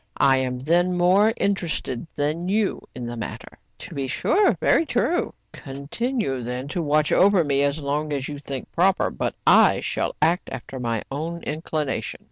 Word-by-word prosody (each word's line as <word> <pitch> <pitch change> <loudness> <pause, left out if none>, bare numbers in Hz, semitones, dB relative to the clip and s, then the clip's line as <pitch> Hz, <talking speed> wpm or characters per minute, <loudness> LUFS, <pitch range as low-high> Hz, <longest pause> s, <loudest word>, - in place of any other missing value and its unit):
I 135 -1 +4
am, 130 -1 -1
then, 175 +7 +1
more 190 +5 +4
interested 170 -9 -2
than 155 +5 -1
you 210 0 +1
in 125 - -5
the 120 0 -5
matter. 115 - -7 0.2
"To - - -9
be 135 -1 -2
sure.'* 400 - +2
" - - -45
Very - - +3
true.*' 335 +2 0
" - - -47
Continue, 140 - -3
then, 125 +3 -4
to 175 +2 -2
watch 150 0 +2
over 195 -2 +5
me 140 -2 +1
as 140 +2 +1
long 150 +1 -2
as 140 -2 -2
you 145 -1 -6
think 140 -2 -7
proper; 185 +2 +2
but - - -3
I - - +6
shall - - -2
act 165 +4 +1
after 130 - -7
my 115 -3 -2
own 165 +4 -4
inclination. 155 -2 -3
150 Hz, 180 wpm, -24 LUFS, 135-180 Hz, 0.2 s, I